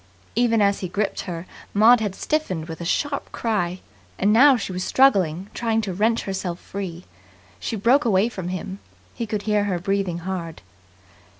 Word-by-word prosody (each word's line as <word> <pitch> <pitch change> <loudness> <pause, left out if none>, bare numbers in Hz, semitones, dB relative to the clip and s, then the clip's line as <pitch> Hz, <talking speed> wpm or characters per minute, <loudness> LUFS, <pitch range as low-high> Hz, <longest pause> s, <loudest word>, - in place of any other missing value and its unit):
Even 230 -2 +3
as 200 0 +2
he 185 - -3
gripped 200 +3 -2
her, 170 0 -5 0.3
Maud 225 +4 +7
had 205 -3 -2
stiffened 190 - -2
with 160 0 -7
a - - -4
sharp 280 - -1
cry; 185 -6 -1 0.4
and 205 +2 +3
now 265 +3 +7
she 200 - -4
was 180 0 -3
struggling, 190 -10 +3
trying 225 -1 0
to 200 -4 -4
wrench 220 +5 +1
herself 190 -3 -3
free. 185 -3 -6 0.5
She 225 - -3
broke 240 +8 +3
away 205 -2 +3
from 190 -7 -6
him. 185 +2 -5 0.3
He 230 - -4
could 210 -1 -3
hear 210 -1 +1
her 190 -3 0
breathing 195 -1 -1
hard. 170 - -5
200 Hz, 175 wpm, -23 LUFS, 180-225 Hz, 0.5 s, Maud